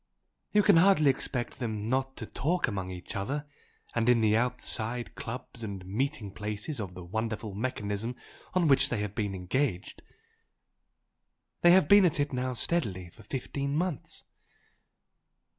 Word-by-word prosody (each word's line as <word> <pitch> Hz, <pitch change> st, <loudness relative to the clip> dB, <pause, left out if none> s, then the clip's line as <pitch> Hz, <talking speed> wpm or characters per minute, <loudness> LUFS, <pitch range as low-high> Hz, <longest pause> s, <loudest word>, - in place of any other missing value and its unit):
You 210 Hz, 0 st, +4 dB
can 200 Hz, -4 st, +6 dB
hardly 165 Hz, -5 st, +6 dB
expect 125 Hz, -2 st, -4 dB
them 110 Hz, -4 st, -3 dB
not 130 Hz, +2 st, -1 dB
to -, -, -4 dB
talk 175 Hz, +5 st, 0 dB
among 95 Hz, -5 st, -3 dB
each 90 Hz, -1 st, -7 dB
other 140 Hz, +10 st, -2 dB, 0.5 s
and 115 Hz, 0 st, +2 dB
in 120 Hz, -1 st, +5 dB
the 110 Hz, -1 st, +4 dB
outside 120 Hz, 0 st, 0 dB
clubs 115 Hz, 0 st, -7 dB
and 100 Hz, -3 st, -5 dB
meeting 115 Hz, +2 st, -2 dB
places 105 Hz, +7 st, -4 dB
of 95 Hz, -4 st, -5 dB
the 90 Hz, -, -8 dB
wonderful 110 Hz, +2 st, -3 dB
mechanism 110 Hz, 0 st, -2 dB, 0.4 s
on 180 Hz, -3 st, +3 dB
which 135 Hz, -2 st, +5 dB
they 115 Hz, -4 st, -1 dB
have 105 Hz, -1 st, -3 dB
been 105 Hz, -3 st, -2 dB
engaged. 95 Hz, +2 st, -2 dB, 1.6 s
They 175 Hz, -, +7 dB
have 185 Hz, +1 st, +6 dB
been 200 Hz, -1 st, +8 dB
at 155 Hz, -, 0 dB
it 145 Hz, -1 st, 0 dB
now 125 Hz, 0 st, -1 dB
steadily 105 Hz, -, -1 dB
for 110 Hz, -, -16 dB
fifteen 140 Hz, +5 st, -3 dB
months." 170 Hz, -3 st, -2 dB
120 Hz, 150 wpm, -29 LUFS, 105-140 Hz, 1.6 s, been